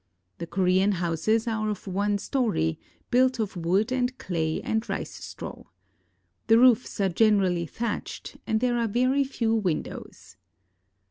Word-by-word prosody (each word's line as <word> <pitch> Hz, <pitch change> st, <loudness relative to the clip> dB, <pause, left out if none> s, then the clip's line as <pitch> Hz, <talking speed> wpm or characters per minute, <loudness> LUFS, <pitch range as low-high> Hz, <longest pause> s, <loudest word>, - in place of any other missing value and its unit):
The 170 Hz, -, -5 dB
Korean 190 Hz, +2 st, +2 dB
houses 180 Hz, +6 st, 0 dB
are 215 Hz, -1 st, -1 dB
of 210 Hz, -3 st, -5 dB
one 200 Hz, +2 st, 0 dB
story, 200 Hz, -, 0 dB, 0.3 s
built 255 Hz, +1 st, +3 dB
of 215 Hz, -4 st, -3 dB
wood 185 Hz, +7 st, +1 dB
and 255 Hz, 0 st, 0 dB
clay 160 Hz, -3 st, -2 dB
and 220 Hz, -, -1 dB
rice -, -, -5 dB
straw. -, -, -8 dB, 0.8 s
The 225 Hz, 0 st, +6 dB
roofs 250 Hz, -2 st, +4 dB
are 195 Hz, -, +3 dB
generally 185 Hz, -3 st, +2 dB
thatched, 235 Hz, +5 st, -5 dB
and 220 Hz, 0 st, +1 dB
there 245 Hz, -1 st, +1 dB
are 230 Hz, -, +1 dB
very 255 Hz, +6 st, +2 dB
few 235 Hz, -4 st, -1 dB
windows. 180 Hz, -, -3 dB
215 Hz, 140 wpm, -26 LUFS, 185-240 Hz, 0.8 s, The